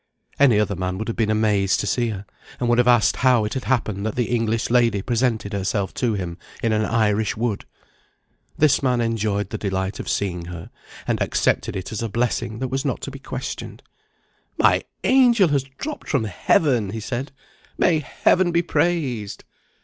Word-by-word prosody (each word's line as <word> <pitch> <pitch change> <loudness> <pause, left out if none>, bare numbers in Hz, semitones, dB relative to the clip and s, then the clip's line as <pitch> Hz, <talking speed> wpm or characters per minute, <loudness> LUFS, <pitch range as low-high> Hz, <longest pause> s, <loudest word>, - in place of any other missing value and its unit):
Any 125 -7 +5
other 105 -1 0
man 90 0 -3
would 110 - -4
have 115 - -2
been 110 -2 0
amazed 105 -3 +2
to - - -3
see 120 -2 0
her, 100 -2 -6 0.3
and 125 - 0
would 120 0 +3
have 125 - +3
asked 120 -3 +4
how 125 -4 +3
it 105 - -3
had 130 - -4
happened 110 -6 0
that 110 0 -2
the 120 -1 -1
English 115 0 -1
lady 115 -5 +3
presented 115 -4 0
herself 100 0 -1
to 120 -4 0
him 90 -3 -5 0.2
in 115 -1 +2
an 110 0 +1
Irish 110 -2 +1
wood. 115 -3 -2 0.9
This 150 -3 +4
man 125 -3 +1
enjoyed 105 -4 -1
the - - -4
delight 95 -1 -2
of - - -5
seeing 90 -4 -2
her, 90 -1 -8 0.4
and - - 0
accepted - - 0
it 95 +2 -5
as 110 - -3
a 115 - -2
blessing 120 0 -1
that 130 +2 -3
was 135 +1 -2
not 135 -5 -1
to 140 - -5
be 135 - -9
questioned. - - -6 0.7
"My - - +3 0.2
angel 240 -8 +5
has 140 -2 +1
dropped 305 0 -6
from 140 -6 +1
Heaven," 110 - +1
he 110 +3 -4
said. 125 +5 -4 0.5
"May 165 -3 +3
Heaven 175 +4 +2
be 170 0 +2
praised!" 135 -13 -1
115 Hz, 190 wpm, -22 LUFS, 105-130 Hz, 0.9 s, Any